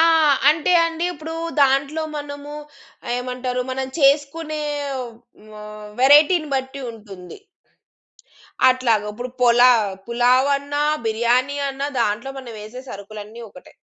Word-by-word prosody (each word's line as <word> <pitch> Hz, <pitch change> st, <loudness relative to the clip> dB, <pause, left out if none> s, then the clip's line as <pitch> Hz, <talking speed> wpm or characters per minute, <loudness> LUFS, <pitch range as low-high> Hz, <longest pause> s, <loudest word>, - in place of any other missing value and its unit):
ఆ! -, -, +6 dB, 0.5 s
అంటే 310 Hz, +3 st, +2 dB
అండి, 330 Hz, +1 st, -3 dB
ఇప్పుడు 320 Hz, +1 st, -8 dB, 0.3 s
దాంట్లో 280 Hz, +3 st, +2 dB
మనము 290 Hz, 0 st, -7 dB, 0.6 s
ఏమంటారు, 250 Hz, 0 st, -3 dB
మనం 265 Hz, 0 st, -3 dB
చేసుకునే, 300 Hz, +2 st, +1 dB, 0.8 s
హ్మ్, 210 Hz, 0 st, -11 dB
వేరైటీని 300 Hz, +4 st, +5 dB
బట్టి 265 Hz, +1 st, -5 dB
ఉంటుంది. 200 Hz, -, -12 dB, 1.3 s
అట్లాగా 235 Hz, -5 st, +1 dB
ఇప్పుడు 245 Hz, +4 st, -6 dB
పొలా 245 Hz, +1 st, +6 dB, 0.4 s
పులావన్నా, 275 Hz, +4 st, +1 dB, 0.2 s
బిర్యాని 240 Hz, +5 st, +1 dB
అన్నా 275 Hz, +1 st, -3 dB
దాంట్లో 230 Hz, +4 st, -1 dB
మనం 245 Hz, -3 st, -9 dB
వేసే 220 Hz, +5 st, -9 dB
సరుకులన్నీ 210 Hz, +3 st, -9 dB
ఒకటే. 180 Hz, -, -16 dB
255 Hz, 105 wpm, -21 LUFS, 230-285 Hz, 1.3 s, ఆ